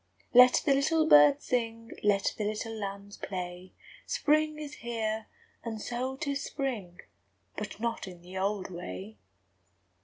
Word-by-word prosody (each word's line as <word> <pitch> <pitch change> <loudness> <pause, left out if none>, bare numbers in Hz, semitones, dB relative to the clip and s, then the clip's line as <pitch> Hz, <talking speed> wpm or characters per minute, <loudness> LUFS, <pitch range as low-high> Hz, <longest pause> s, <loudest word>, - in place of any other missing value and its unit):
II 90 +1 -37
Let 250 0 +5
the 285 - +5
little 310 +4 +3
birds 145 - +7
sing; 230 -2 -2
Let 200 -1 +2
the 215 - -3
little 215 +2 -3
lambs 200 -1 -6
play; 180 -1 -6 0.4
Spring 305 +1 +2
is 300 -1 -7
here; 220 -2 -3 0.4
and 225 -2 -4
so 255 +4 -3
âtis 280 -1 -1
spring; 245 - -4 0.5
But - - -6
not 230 -3 -2
in 175 -2 -11
the 180 +1 -11
old 195 0 -1
way! 105 - -7
215 Hz, 145 wpm, -30 LUFS, 185-255 Hz, 0.5 s, birds